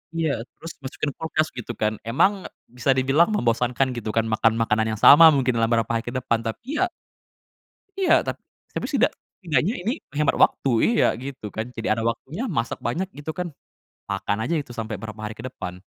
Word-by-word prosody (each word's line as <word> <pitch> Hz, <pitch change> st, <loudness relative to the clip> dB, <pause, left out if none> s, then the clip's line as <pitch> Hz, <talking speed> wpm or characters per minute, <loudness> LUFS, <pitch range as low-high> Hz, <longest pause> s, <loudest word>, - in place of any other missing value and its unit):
Iya 160 Hz, -7 st, 0 dB, 0.2 s
terus 165 Hz, 0 st, -8 dB
masukin 145 Hz, +2 st, -3 dB
kulkas 160 Hz, -1 st, -1 dB
gitu 120 Hz, -1 st, -5 dB
kan, 110 Hz, 0 st, +1 dB
emang 185 Hz, -, +1 dB, 0.2 s
bisa 125 Hz, +2 st, 0 dB
dibilang 135 Hz, +7 st, +3 dB
membosankan 125 Hz, -, +1 dB
gitu 115 Hz, -2 st, -4 dB
kan 115 Hz, -, +3 dB
makan 110 Hz, 0 st, +2 dB
makanan 110 Hz, -1 st, +1 dB
yang -, -, -10 dB
sama 165 Hz, +3 st, +10 dB
mungkin 130 Hz, -2 st, +2 dB
dalam 115 Hz, -1 st, +2 dB
berapa 115 Hz, -2 st, +2 dB
hari 115 Hz, 0 st, 0 dB
ke -, -, -2 dB
depan. 120 Hz, -2 st, 0 dB
Tapi 235 Hz, -, -4 dB
ya 370 Hz, -, +4 dB, 1.1 s
Iya 380 Hz, -, +2 dB
ta -, -, 0 dB, 0.4 s
tapi -, -, -3 dB
setidak -, -, +2 dB, 0.3 s
setidaknya 165 Hz, -, +1 dB
ini 210 Hz, +6 st, 0 dB, 0.2 s
menghemat 150 Hz, 0 st, +1 dB
waktu, 135 Hz, -, +2 dB, 0.2 s
iya 235 Hz, 0 st, +3 dB, 0.2 s
gitu 135 Hz, -5 st, -7 dB
kan. 110 Hz, -, -2 dB
Jadi 115 Hz, -, -3 dB
ada 115 Hz, -, -3 dB
waktunya, 145 Hz, -, -5 dB
masak 115 Hz, 0 st, -1 dB
banyak 175 Hz, +11 st, -1 dB
gitu 145 Hz, +2 st, -5 dB
kan, 180 Hz, 0 st, -2 dB, 0.6 s
makan 100 Hz, +1 st, -1 dB
aja 165 Hz, +8 st, 0 dB
itu 135 Hz, -, -13 dB
sampe 110 Hz, -1 st, -4 dB
berapa 110 Hz, -1 st, -7 dB
hari 105 Hz, -, -5 dB
ke 110 Hz, -, -11 dB
depan. 90 Hz, -7 st, -6 dB
125 Hz, 190 wpm, -24 LUFS, 115-160 Hz, 1.1 s, sama